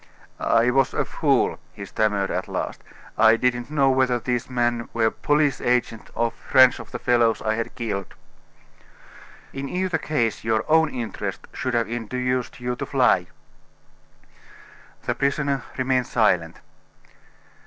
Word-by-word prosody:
"I 115 +2 +3
was 135 0 +2
a - - 0
fool," - - +1
he 100 - -8
stammered 100 -1 0
at - - -2
last. - - -4 0.4
"I 110 0 +7
didn't 120 0 0
know 140 -3 +3
whether 130 -2 +2
these 120 0 -2
men 120 -1 -1
were 115 -1 +2
police 145 -2 +1
agents 120 -2 -1
or 115 0 0
friends 130 +1 +4
of - - -10
the - - -5
fellows 120 -2 +2
I 110 0 +1
had 115 +1 -4
killed." 110 -6 -4 1.4
"In 135 0 -5
either 180 -2 -1
case 120 -8 -1
your 110 -1 0
own 160 0 +4
interest 120 -5 -5
should 130 -1 -2
have 115 -3 +1
induced 125 +2 -3
you 125 0 -2
to - - -4
fly." 125 -10 +3 1.8
The - - -1
prisoner 140 -1 -1
remained 130 -1 +1
silent. 90 -8 +1
120 Hz, 140 wpm, -23 LUFS, 115-130 Hz, 1.8 s, I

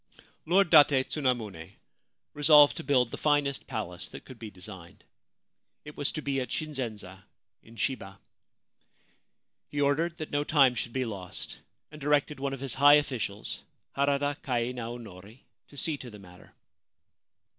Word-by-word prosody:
Lord 180 0 +3
Date 140 -2 +6
Tsunamune 115 - -2 0.6
resolved 150 0 +6
to - - -5
build 130 -4 +2
the - - -6
finest 145 -2 +1
palace 105 -7 -5
that - - -11
could 130 -3 -12
be 110 - -7
designed. 90 -2 -11 0.8
It 150 - -10
was 145 - -1
to 155 - -5
be 135 -1 -1
at 125 - -5
Shinzenza, 110 - -5 0.4
in 115 - -17
Shiba. 100 -6 -3 1.5
He 145 - -4
ordered 160 +4 +1
that 155 - -6
no 145 0 +1
time 140 -4 +4
should 120 -1 -4
be 130 +1 -1
lost, 95 -5 -7 0.3
and 150 0 -12
directed 145 0 +1
one 140 0 -2
of 135 - -7
his 135 -3 -2
high 145 +2 +7
officials, 120 -8 -2 0.4
Harada 140 +1 0
Kai 120 -2 -1
Naonori, 115 -3 -8 0.3
to 145 - -15
see 155 +1 -1
to 130 - -9
the 105 - -11
matter. 90 -2 -16
130 Hz, 150 wpm, -29 LUFS, 110-145 Hz, 1.5 s, high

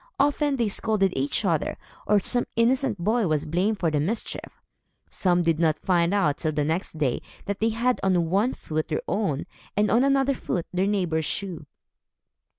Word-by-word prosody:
Often 290 0 +2
they 235 -4 +1
scolded 200 -2 +1
each 135 +2 0
other; - - 0 0.3
or, 210 -1 +5
some 245 +5 0
innocent 240 0 +2
boy 215 +4 +1
was 155 -2 0
blamed 185 +7 0
for 170 -4 0
the 150 - +1
mischief. 200 +11 -4 0.5
Some 175 -2 +2
did 165 -2 +1
not 160 -3 +2
find 175 -2 +1
out, 165 -8 +1
till 155 -1 -1
the 150 -1 0
next 160 +1 -2
day, 140 -5 0 0.2
that 200 -1 -3
they 225 - +2
had 240 +3 0
on 175 -4 +1
one 210 +7 +2
foot 155 0 -3
their 155 - -2
own, 190 -10 -1 0.3
and 210 0 +3
on 240 +3 +4
another 275 0 +3
foot, 180 -8 -3
their 185 +2 +1
neighbor's 175 -6 0
shoe. 175 -6 -4
190 Hz, 180 wpm, -25 LUFS, 160-225 Hz, 0.5 s, or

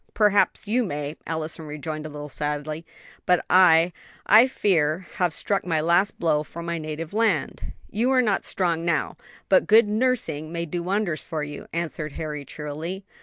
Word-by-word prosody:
"Perhaps 210 0 +3
you 245 +4 +2
may," 150 -5 -4
Allison 160 0 -4
rejoined 155 +1 -5
a - - -9
little 150 0 -7
sadly; 150 +2 -4 0.4
"but 180 -1 +3
I, 175 -2 +6 0.3
I 225 +4 +7
fear, 180 - +1
have 180 -2 +2
struck 195 +5 -1
my 165 -3 0
last 170 +6 +2
blow 155 -3 +1
for 170 +2 -8
my 170 0 -3
native 155 +2 -6
land." 210 -10 0
"You 230 +5 0
are 260 -1 +4
not 210 -4 +1
strong 170 -3 -1
now, 170 -2 0 0.3
but 190 - +4
good 220 0 +6
nursing 215 - 0
may 170 0 -3
do 170 +2 -4
wonders 185 -2 -1
for 155 -3 -4
you," 145 -1 -7
answered 160 -3 -4
Harry 150 -2 -5
cheerily. 155 +7 -6
170 Hz, 170 wpm, -24 LUFS, 155-195 Hz, 0.4 s, I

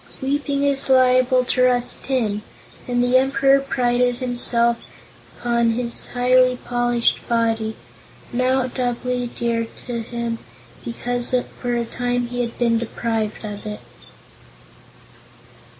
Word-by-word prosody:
Weeping 280 +1 -1
is 280 -1 +1
liable 255 0 +4
to 255 - 0
rust 245 -1 +1
tin, 220 -6 0 0.5
and 245 0 +1
the 245 +1 +4
Emperor 270 +1 +4
prided 245 -2 +1
himself 240 -1 +2 0.5
upon 235 -1 +1
his 235 0 -2
highly 250 0 +3
polished 240 -1 0
body 225 -2 0 0.6
now 255 +1 +2
doubly 250 0 -2
dear 235 -1 -2 0.2
to 240 -1 -3
him 235 0 -4 0.4
because 245 +1 -1 0.2
for 245 -1 -1
a 235 0 -1
time 245 +1 -1
he 245 0 -2
had 235 -1 -4
been 230 -2 +2
deprived 225 -2 -3
of 205 -1 -6
it. 210 0 -6
245 Hz, 120 wpm, -21 LUFS, 235-255 Hz, 0.6 s, liable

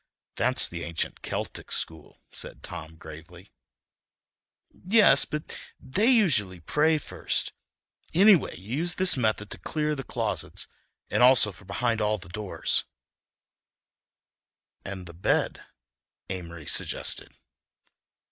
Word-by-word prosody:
"Of - - -49 0.3
course, - - -39
that's - - +2
the 85 -1 -6
ancient 85 -1 -2
Celtic - - -5
school," 80 0 -3
said - - -6
Tom 80 +1 -8
gravely. 80 +4 -12 1.2
"Yes—but 185 -6 +3 0.2
they 190 - 0
usually 135 - +4
pray 155 - +2
first. 150 - -2 0.6
Anyway, 190 - +5
you 105 +9 -5
use 175 +3 0
this 185 0 +5
method 110 -4 -1
to - - -7
clear 150 -1 -1
the 135 -2 -5
closets 115 -5 -3 0.4
and - - +2
also 125 -4 +6
for 95 - -16
behind 115 +1 -1
all 105 0 +1
doors—" 100 +2 -1 2.0
"And 95 -2 -6
the 85 - -11
bed," 85 - 0 0.7
Amory 85 -4 -7
suggested. - - -1
110 Hz, 115 wpm, -27 LUFS, -, 2.0 s, also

